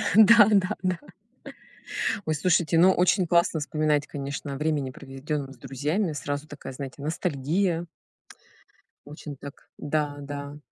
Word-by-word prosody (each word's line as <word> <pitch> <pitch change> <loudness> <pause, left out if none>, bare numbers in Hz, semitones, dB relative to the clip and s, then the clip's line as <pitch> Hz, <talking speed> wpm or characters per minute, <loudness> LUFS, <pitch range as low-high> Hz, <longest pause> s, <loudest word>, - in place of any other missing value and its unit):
Да, 220 0 +8
да, 200 0 +3
да. 185 -1 0 1.3
Ой, 155 - +1
слушайте, 170 0 +2
ну 180 +3 +7
очень 185 +1 +3
классно 170 -1 +2
вспоминать, 150 0 0
конечно, 140 0 -5
время, 150 -3 -1
проведенное 140 0 -5
с - - -20
друзьями, 150 - -2
сразу 145 +1 -4
такая, 145 -2 -8
знаете, 135 +1 -7
ностальгия. 165 +3 -1 1.2
Очень 145 0 -9
так, 140 +1 -11
да, 145 -1 -1
да. 145 0 -7
150 Hz, 125 wpm, -26 LUFS, 140-175 Hz, 1.3 s, Да